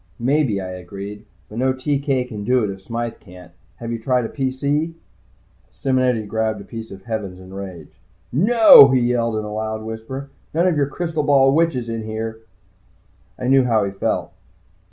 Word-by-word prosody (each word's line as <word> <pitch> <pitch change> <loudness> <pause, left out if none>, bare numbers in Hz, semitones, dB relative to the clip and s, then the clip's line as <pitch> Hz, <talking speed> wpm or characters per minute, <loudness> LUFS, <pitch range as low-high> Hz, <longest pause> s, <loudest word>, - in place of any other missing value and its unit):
"Maybe," 130 -4 +1
I 95 -1 -5
agreed. 100 +3 -8 0.2
"But 110 - -7
no 130 +1 +2
TK 135 -1 -1
can 105 -4 -6
do 125 +2 +2
it 105 - -1
if 95 0 -9
Smythe 115 +2 -4
can't. 90 -1 -14 0.2
Have 115 0 -6
you 115 - -3
tried 125 +1 +1
a - - -4
PC?" 140 +4 -1 0.8
Simonetti 130 -4 0
grabbed 110 0 -1
a - - -9
piece 115 0 -8
of 95 -1 -10
the - - -28
heavens 105 -6 -4
in 95 0 -12
rage. 95 -5 -9 0.3
"No!" 210 - +8
he 130 -1 +3
yelled 120 -2 +1
in 110 - -2
his 105 - -6
loud 110 0 -3
whisper. 115 +5 -7 0.2
"None 170 +2 +3
of 180 -3 +2
your 145 -2 +1
crystal 160 +1 -2
ball 135 -2 +4
witches 155 -7 +1
in 115 -1 -3
here!" 110 +1 -5 1.0
I 125 - -4
knew 135 0 +5
how 110 -4 +2
he 100 - -2
felt. 95 - -2
115 Hz, 185 wpm, -21 LUFS, 105-135 Hz, 1.0 s, No